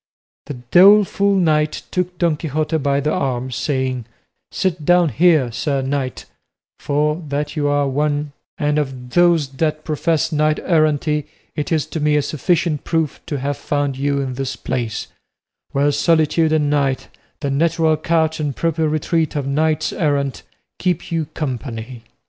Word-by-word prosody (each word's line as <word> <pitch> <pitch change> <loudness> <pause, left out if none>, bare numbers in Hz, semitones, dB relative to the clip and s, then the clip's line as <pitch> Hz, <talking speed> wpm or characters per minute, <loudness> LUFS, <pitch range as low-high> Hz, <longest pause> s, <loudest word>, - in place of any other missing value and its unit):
The 145 - -5
doleful 195 - +5
knight 155 -4 +1
took 180 -1 -2
Don 170 -3 +2
Quixote 155 +1 -1
by 140 0 +1
the 150 +2 0
arm, 130 -1 -2
saying, 130 -2 -2 0.5
"Sit 180 -5 -1
down 175 +1 +4
here, 150 -1 +3
sir 135 +3 -1
knight; 135 -1 -3 0.5
for, 150 +3 0
that 145 +1 -3
you 145 -2 0
are 145 -1 +2
one, 145 +1 -1 0.3
and 150 0 +1
of 130 -4 -5
those 170 -3 +4
that 155 +2 -2
profess 160 +1 0
knight 155 0 +2
errantry, 150 -2 +1 0.3
it 150 - -3
is 155 -3 +1
to 160 - -5
me 150 0 +2
a 150 - +2
sufficient 155 +1 0
proof 160 -3 -1
to 145 - -2
have 140 +1 -2
found 145 -1 -1
you 140 +1 0
in 130 -2 -3
this 135 +1 -3
place, 120 -4 -3 0.7
where 145 +1 +2
solitude 160 0 +2
and 155 -2 +2
night, 140 -3 0 0.3
the 140 - -1
natural 160 +2 +2
couch 160 0 0
and 145 -4 -2
proper 160 -1 0
retreat 155 +1 0
of 145 -2 -1
knights 155 +2 0
errant, 140 -4 -1 0.4
keep 180 -1 -1
you 165 -2 0
company." 125 -4 -5
150 Hz, 155 wpm, -19 LUFS, 140-160 Hz, 0.7 s, doleful